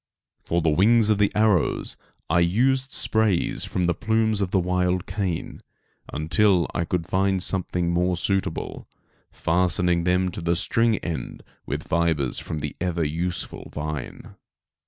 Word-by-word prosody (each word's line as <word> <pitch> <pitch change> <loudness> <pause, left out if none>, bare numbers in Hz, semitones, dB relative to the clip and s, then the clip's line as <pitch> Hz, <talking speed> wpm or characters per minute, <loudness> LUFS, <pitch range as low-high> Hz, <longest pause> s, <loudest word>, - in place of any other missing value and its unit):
For 85 0 0
the 80 - +3
wings 110 +7 +4
of 105 -2 +2
the 105 - +3
arrows 105 -6 +1 0.3
I 85 +2 +2
used 130 +10 +2
sprays 110 -5 +1
from 90 - -2
the 90 0 +2
plumes 110 +1 0
of 95 - 0
the 95 - +1
wild 90 0 0
cane, 90 -3 -3 0.5
until 90 +4 +2
I 85 - -1
could 85 -1 -2
find 95 0 +1
something 90 -3 0
more 90 +1 +1
suitable, 95 -1 -2 0.4
fastening 90 0 +1
them 90 +1 +1
to 85 - -6
the 85 +1 +1
string 115 +5 +1
end 85 -3 -5 0.2
with - - -4
fibres 80 -5 +1
from 75 - -5
the 75 -1 -4
ever 85 -2 0
useful 85 +4 -4
vine. 75 -2 -6
90 Hz, 145 wpm, -24 LUFS, 85-100 Hz, 0.5 s, wings